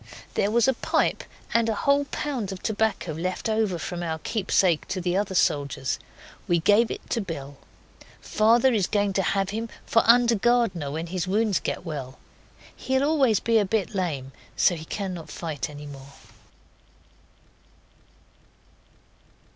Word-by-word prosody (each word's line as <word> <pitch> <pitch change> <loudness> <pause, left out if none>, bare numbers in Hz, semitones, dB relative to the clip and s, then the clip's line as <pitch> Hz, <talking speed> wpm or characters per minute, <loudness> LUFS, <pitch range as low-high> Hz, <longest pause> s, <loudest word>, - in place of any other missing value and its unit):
There 200 - +1
was 235 +2 +3
a 265 - +4
pipe - - 0 0.3
and 230 -1 +3
a 220 - 0
whole 280 +5 +2
pound 265 -9 -3
of 190 - -8
tobacco 215 -5 0
left 180 +7 -3
over 215 -4 0
from 175 +1 -5
our 160 -2 -2
keepsake 185 -3 +1
to 185 0 -3
the 175 0 -1
other 195 -1 -1
soldiers. 140 -5 0 0.5
We 175 - +3
gave 210 +7 +4
it - - -6
to 230 - +1
Bill. 145 -7 -7 0.6
Father 230 +4 +3
is 200 -5 +1
going 205 -2 +1
to 195 - +1
have 195 +1 0
him 225 +2 -4 0.2
for 230 - +4
under 235 0 +6
gardener 225 -9 +1
when 160 +4 -4
his 180 +1 -3
wounds 210 0 +1
get - - -4
well. 135 -5 -6 0.6
He'll 265 +1 0
always 275 -8 +3
be 230 -1 +3
a - - +3
bit 200 -1 -1
lame, 150 -9 -2 0.3
so - - +4
he 160 -1 -8
cannot 185 -3 -5
fight 155 -6 -4
any 150 0 -9
more. 140 -1 -11
195 Hz, 155 wpm, -25 LUFS, 165-225 Hz, 0.6 s, under